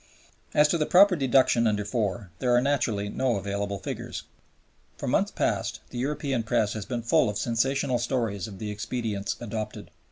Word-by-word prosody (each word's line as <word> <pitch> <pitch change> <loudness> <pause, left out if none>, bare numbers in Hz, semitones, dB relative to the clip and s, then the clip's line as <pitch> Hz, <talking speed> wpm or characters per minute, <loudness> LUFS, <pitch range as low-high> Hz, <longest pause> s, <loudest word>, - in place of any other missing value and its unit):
As 150 0 +6
to 170 - +1
the 150 - +1
proper 190 +1 +6
deduction 130 -4 +3
under 105 -1 +1
(iv.) 105 -2 -2
there 125 -1 +2
are - - +6
naturally 120 -7 0
no 125 +3 0
available 100 0 -2
figures. - - -5 0.7
For - - -5
months - - +2
past - - -1
the 120 - -5
European 135 -1 -1
press 115 -2 +1
has 110 -2 -5
been 120 -2 -3
full 115 0 +3
of 105 - -3
sensational 130 +2 +1
stories 115 -6 -1
of 100 -3 -9
the 105 +1 -4
expedients 105 -1 -3
adopted. 110 -2 -5
115 Hz, 170 wpm, -27 LUFS, 105-130 Hz, 0.7 s, As